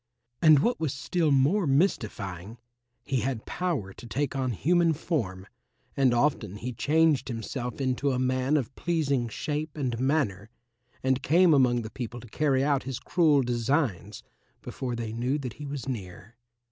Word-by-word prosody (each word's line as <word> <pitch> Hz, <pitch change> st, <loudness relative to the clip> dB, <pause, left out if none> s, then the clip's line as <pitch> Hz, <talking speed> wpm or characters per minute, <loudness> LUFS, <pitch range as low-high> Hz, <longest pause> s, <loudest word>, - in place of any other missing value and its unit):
And 155 Hz, -2 st, +7 dB
what 235 Hz, -, +1 dB
was 155 Hz, -4 st, -1 dB
still 160 Hz, +4 st, 0 dB
more 145 Hz, +7 st, +3 dB
mystifying, 110 Hz, -, -1 dB, 0.5 s
he 135 Hz, -, -1 dB
had 125 Hz, -2 st, -3 dB
power 155 Hz, -, -2 dB
to 120 Hz, -, -12 dB
take 140 Hz, +3 st, -2 dB
on 130 Hz, -1 st, 0 dB
human 170 Hz, -, +2 dB
form, 110 Hz, -, -3 dB, 0.5 s
and 135 Hz, -2 st, +3 dB
often 120 Hz, -6 st, +1 dB
he 120 Hz, +4 st, -5 dB
changed 150 Hz, +4 st, +2 dB
himself 120 Hz, +1 st, -5 dB
into 135 Hz, +1 st, 0 dB
a 130 Hz, -, 0 dB
man 130 Hz, +3 st, +1 dB
of 135 Hz, -2 st, -3 dB
pleasing 140 Hz, -8 st, 0 dB
shape 150 Hz, +6 st, -4 dB
and 125 Hz, -5 st, -2 dB
manner 125 Hz, -8 st, 0 dB, 0.5 s
and 130 Hz, 0 st, +1 dB
came 170 Hz, +2 st, +5 dB
among 125 Hz, -4 st, +3 dB
the 110 Hz, -, -7 dB
people 120 Hz, -1 st, -6 dB
to 120 Hz, -, -12 dB
carry 135 Hz, +2 st, +1 dB
out 140 Hz, -1 st, +2 dB
his 130 Hz, -2 st, -5 dB
cruel 155 Hz, -6 st, +3 dB
designs 120 Hz, -, -1 dB, 0.4 s
before 125 Hz, -2 st, -4 dB
they 115 Hz, -2 st, -4 dB
knew 125 Hz, +5 st, 0 dB
that 130 Hz, -5 st, -5 dB
he 145 Hz, -, -8 dB
was 140 Hz, -1 st, -5 dB
near. 105 Hz, -2 st, -7 dB
130 Hz, 160 wpm, -27 LUFS, 120-150 Hz, 0.5 s, And